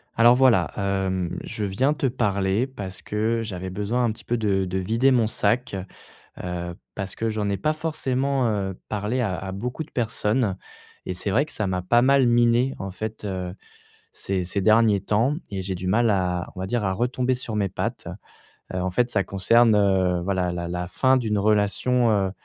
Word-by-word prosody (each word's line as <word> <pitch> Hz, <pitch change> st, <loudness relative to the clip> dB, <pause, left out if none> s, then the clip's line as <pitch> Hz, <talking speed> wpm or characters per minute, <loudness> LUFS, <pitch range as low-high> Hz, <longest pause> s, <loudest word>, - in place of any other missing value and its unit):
Alors, 120 Hz, +1 st, +6 dB
voilà, 130 Hz, -2 st, +4 dB
hem, 95 Hz, -3 st, -1 dB
je 105 Hz, -, -5 dB
viens 130 Hz, +10 st, +1 dB
te 140 Hz, -, -2 dB
parler 105 Hz, -2 st, +1 dB
parce 100 Hz, -7 st, -8 dB
que 110 Hz, +2 st, -1 dB
j'avais 95 Hz, -4 st, -5 dB
besoin 105 Hz, +6 st, -1 dB
un 115 Hz, -, +1 dB
petit 110 Hz, -, -10 dB
peu 120 Hz, -, -1 dB
de 100 Hz, -3 st, +1 dB
de 90 Hz, +1 st, -3 dB
vider 115 Hz, +8 st, +2 dB
mon 125 Hz, -4 st, +3 dB
sac, 115 Hz, +2 st, 0 dB, 0.7 s
heu, 85 Hz, -1 st, -4 dB, 0.2 s
parce 100 Hz, -1 st, -5 dB
que 115 Hz, -, -2 dB
j'en 105 Hz, -2 st, -1 dB
ai 100 Hz, -, -1 dB
pas 155 Hz, +8 st, 0 dB
forcément, 135 Hz, -4 st, -1 dB
heu, 100 Hz, -3 st, -1 dB
parlé 105 Hz, +4 st, -1 dB
à 100 Hz, -7 st, -1 dB
à 95 Hz, +1 st, -6 dB
beaucoup 125 Hz, +10 st, -4 dB
de 155 Hz, -, -22 dB
personnes 110 Hz, -3 st, 0 dB, 0.5 s
et -, -, -3 dB
c'est 90 Hz, +3 st, -5 dB
vrai 125 Hz, +9 st, +3 dB
que 155 Hz, -, -12 dB
ça 105 Hz, -, -2 dB
m'a 90 Hz, -1 st, -1 dB
pas 120 Hz, +6 st, +4 dB
mal 135 Hz, +1 st, +4 dB
miné, 120 Hz, +2 st, +3 dB
en 95 Hz, 0 st, -5 dB
fait, 110 Hz, +2 st, -6 dB
heu, 90 Hz, -2 st, -4 dB, 0.6 s
ces 95 Hz, -2 st, -2 dB
ces 95 Hz, +3 st, -2 dB
derniers 110 Hz, 0 st, +4 dB
temps 115 Hz, +9 st, +1 dB, 0.2 s
et 95 Hz, -2 st, -3 dB
j'ai 95 Hz, 0 st, -3 dB
du 90 Hz, 0 st, -4 dB
mal 115 Hz, +4 st, +3 dB
à, 90 Hz, -3 st, 0 dB
on 90 Hz, -, -7 dB
va 95 Hz, -, -3 dB
dire, 115 Hz, +2 st, -1 dB
à 95 Hz, -, +1 dB
retomber 125 Hz, +4 st, 0 dB
sur 120 Hz, -3 st, -5 dB
mes 100 Hz, -2 st, +1 dB
pattes. -, -, -4 dB, 0.7 s
Heu, -, -, -1 dB
en 95 Hz, -, -1 dB
fait, 120 Hz, +7 st, +1 dB
ça 100 Hz, -4 st, +1 dB
concerne, 115 Hz, +4 st, +4 dB
heu, 95 Hz, -3 st, +2 dB
voilà, 90 Hz, -1 st, -1 dB
la 85 Hz, -1 st, -4 dB
la 90 Hz, 0 st, -3 dB
fin 130 Hz, +9 st, +2 dB
d'une 110 Hz, -5 st, 0 dB
relation, 110 Hz, +4 st, +2 dB
heu, 100 Hz, -3 st, +2 dB
105 Hz, 200 wpm, -24 LUFS, 95-120 Hz, 0.7 s, Alors